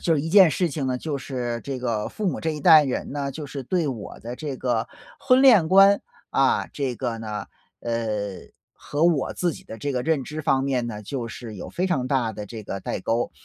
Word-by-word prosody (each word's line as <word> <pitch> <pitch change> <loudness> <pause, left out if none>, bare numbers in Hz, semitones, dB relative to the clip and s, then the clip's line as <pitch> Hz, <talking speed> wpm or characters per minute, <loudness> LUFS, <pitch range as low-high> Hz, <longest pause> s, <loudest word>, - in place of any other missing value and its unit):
就 165 - +3
是 145 - +1
一 160 - -3
件 190 -3 +8
事 175 +2 0
情 140 -2 -3
呢， 130 -1 0
就 145 +1 -3
是 120 -3 -4
这 135 -2 -4
个 115 -4 -2
父 210 - -4
母 180 - -1
这 160 - -1
一 150 -1 -5
代 160 -1 +8
人 135 0 -3
呢， 140 -1 -2
就 150 +2 -7
是 135 0 -6
对 170 +4 0
我 115 -7 -5
的 120 +2 -6
这 140 -1 -5
个 120 -2 -1 0.3
婚 255 0 +4
恋 215 -12 +7
观， 195 +1 +6 0.3
啊， 135 -1 +2
这 130 -4 -2
个 120 -3 -3
呢， 105 -2 -5 0.4
呃， 115 -1 -2 0.8
和 150 +3 -2
我 165 -6 +2
自 175 -2 0
己 - - -11
的 110 - -9
这 140 +5 -3
个 125 -1 -1
认 150 -4 0
知 155 +1 -5
方 135 -2 +1
面 125 -3 0
呢， 105 -2 -6
就 120 +1 -4
是 115 -2 -8
有 - - -7
非 185 +2 -1
常 130 -8 0
大 125 -5 +1
的 105 0 -7
这 110 +1 -8
个 95 -1 -5
代 - - -4
沟。 115 +5 0
135 Hz, 250 characters per minute, -24 LUFS, 120-160 Hz, 0.8 s, 件